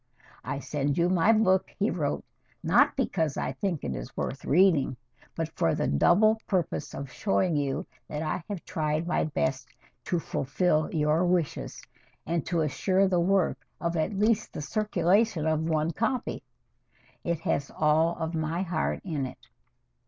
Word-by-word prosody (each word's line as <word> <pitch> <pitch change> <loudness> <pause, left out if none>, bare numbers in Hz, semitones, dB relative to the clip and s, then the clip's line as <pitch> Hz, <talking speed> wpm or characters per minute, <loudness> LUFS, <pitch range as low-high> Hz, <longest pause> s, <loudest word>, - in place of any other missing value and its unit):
"I - - -3
send 140 0 -2
you 170 +1 +3
my 185 +3 +4
book," 190 -4 +3
he 205 - +1
wrote, 150 -7 -2 0.4
"not 205 - +4
because 165 - 0
I - - -1
think 170 +3 -3
it 65 - -2
is - - -8
worth 135 - -3
reading, 155 -6 +3 0.4
but 165 -1 -2
for 80 - +2
the - - 0
double 210 - +4
purpose 180 -6 -1
of 140 -2 -6
showing 190 -5 +1
you 140 -2 -1 0.2
that 150 +1 -4
I 155 +2 -2
have 200 -5 -5
tried 155 -1 -1
my 175 - +1
best 130 -4 -1 0.4
to 175 - 0
fulfil 155 +1 0
your 155 +1 +2
wishes, 175 -4 -1 0.4
and 165 -1 -1
to 170 -1 +1
assure 185 +6 +2
the 180 -2 +2
work 185 0 +2 0.2
of 170 0 -1
at 170 +5 -1
least 215 +1 +1
the - - -5
circulation 200 0 +1
of 160 +1 +1
one 155 0 +1
copy. 235 +7 -2 0.8
It 170 -2 -1
has 140 -3 -1
all 160 +2 +2
of 160 0 -3
my 160 +3 -1
heart 180 -1 -1
in 150 -8 -2
it." 125 - -14
165 Hz, 160 wpm, -28 LUFS, 150-190 Hz, 0.8 s, my